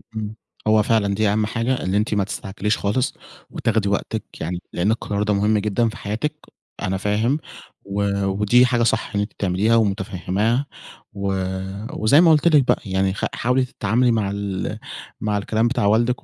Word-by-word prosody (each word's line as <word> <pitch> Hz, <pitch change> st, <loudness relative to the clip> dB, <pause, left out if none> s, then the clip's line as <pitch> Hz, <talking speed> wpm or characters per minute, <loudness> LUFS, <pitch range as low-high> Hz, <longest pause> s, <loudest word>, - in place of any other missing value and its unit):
امم 110 Hz, 0 st, -4 dB, 0.3 s
هو 110 Hz, -1 st, +5 dB
فعلًا 105 Hz, -3 st, +2 dB
دي 110 Hz, 0 st, +2 dB
أهم 105 Hz, +1 st, +1 dB
حاجة، 120 Hz, +3 st, -1 dB
إن 95 Hz, -, -1 dB
أنتِ 105 Hz, +2 st, +1 dB
ما 100 Hz, -2 st, +2 dB
تستعجليش 100 Hz, +2 st, -2 dB
خالص 125 Hz, +7 st, 0 dB, 0.4 s
وتاخدي 110 Hz, -3 st, 0 dB
وقتِك 105 Hz, +2 st, -2 dB, 0.2 s
يعني، 85 Hz, +2 st, -3 dB
لأن 95 Hz, +5 st, +1 dB
القرار 105 Hz, -2 st, -1 dB
ده 105 Hz, -1 st, +1 dB
مُهم 105 Hz, +2 st, +2 dB
جدًا 105 Hz, +3 st, +1 dB
في -, -, -9 dB
حياتِك، 115 Hz, +9 st, -3 dB, 0.5 s
أنا 95 Hz, 0 st, -1 dB
فاهم 110 Hz, +8 st, +1 dB, 0.5 s
و 100 Hz, 0 st, -1 dB
ودي 105 Hz, +6 st, +4 dB
حاجة 120 Hz, -1 st, +1 dB
صح -, -, 0 dB
اللي 100 Hz, 0 st, +1 dB
أنتِ 105 Hz, -, -6 dB
بتعمليها 100 Hz, +4 st, +1 dB
ومتفهِماها 100 Hz, -, 0 dB, 0.5 s
و 100 Hz, -1 st, -3 dB, 0.7 s
وزي 145 Hz, +3 st, +4 dB
ما 170 Hz, -, +6 dB
قُلت 155 Hz, +2 st, +4 dB
لِك 150 Hz, -5 st, +5 dB
بقى، -, -, +2 dB
يعني 95 Hz, 0 st, 0 dB
خ -, -, -2 dB
حاولي 125 Hz, +2 st, +1 dB
تتعاملي 120 Hz, +1 st, +1 dB
مع 105 Hz, -3 st, 0 dB
ال 100 Hz, -2 st, -3 dB, 0.4 s
مع 105 Hz, -1 st, 0 dB
الكلام 110 Hz, +3 st, +1 dB
بتاع 120 Hz, -3 st, 0 dB
والدِك 115 Hz, +4 st, +2 dB
105 Hz, 175 wpm, -22 LUFS, 100-115 Hz, 0.7 s, ما